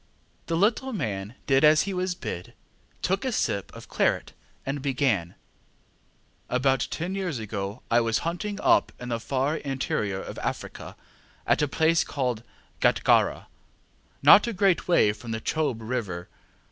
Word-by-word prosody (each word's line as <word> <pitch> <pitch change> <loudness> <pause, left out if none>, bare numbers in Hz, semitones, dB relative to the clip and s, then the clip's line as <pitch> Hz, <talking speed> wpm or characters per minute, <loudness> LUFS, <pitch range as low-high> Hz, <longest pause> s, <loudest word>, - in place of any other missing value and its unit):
ŌĆØ - - -38
The 165 - 0
little 235 +7 +1
man 105 - -3
did 135 0 +3
as 155 0 +6
he 200 - -3
was 180 0 -1
bid, 100 - -6 0.5
took 190 +2 0
a 260 - -1
sip 100 - -1
of - - -11
claret, - - 0 0.3
and 140 +1 -3
began: 125 - 0 1.1
ŌĆ£About 130 0 +2
ten 175 +4 -3
years 185 -7 -2
ago 105 0 -5
I 120 +1 +5
was 115 -1 +1
hunting 200 +5 -3
up - - +4
in 125 - -6
the 115 -1 -1
far 135 +6 -1
interior 130 -8 -2
of - - -7
Africa, - - -5 0.5
at - - +2
a 150 - +2
place 160 +4 +2
called 125 -5 -2 0.4
Gatgarra, - - +3 0.8
not 210 - +8
a 235 - -2
great 195 -2 +2
way 110 -12 +4
from 115 +2 -11
the 110 0 -2
Chobe 130 -3 -1
River. 105 -7 -3
135 Hz, 155 wpm, -26 LUFS, 110-170 Hz, 1.1 s, not